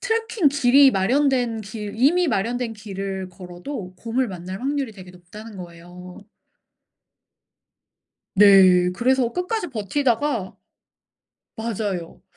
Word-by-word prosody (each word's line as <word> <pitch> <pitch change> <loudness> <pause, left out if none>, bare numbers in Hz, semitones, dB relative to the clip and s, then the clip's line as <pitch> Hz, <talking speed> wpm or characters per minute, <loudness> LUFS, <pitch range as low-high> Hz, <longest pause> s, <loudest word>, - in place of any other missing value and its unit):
트래킹 450 -7 +1
길이 275 0 +5
마련된 245 +2 +1
길 210 0 -7
이미 340 +9 +3
마련된 230 +2 -1
길을 195 -3 -6
걸어도 180 +3 -8
곰을 240 +5 -1
만날 185 +2 -7
확률이 275 -3 -2
되게 185 -2 -12
높다는 200 +5 -12
거예요. 175 +1 -11 2.2
네. 185 -3 +6
그래서 250 0 +1
끝까지 360 +2 -2
버티다가 235 -1 -1 1.1
맞아요. 205 -6 -4
220 Hz, 235 characters per minute, -22 LUFS, 185-265 Hz, 2.2 s, 네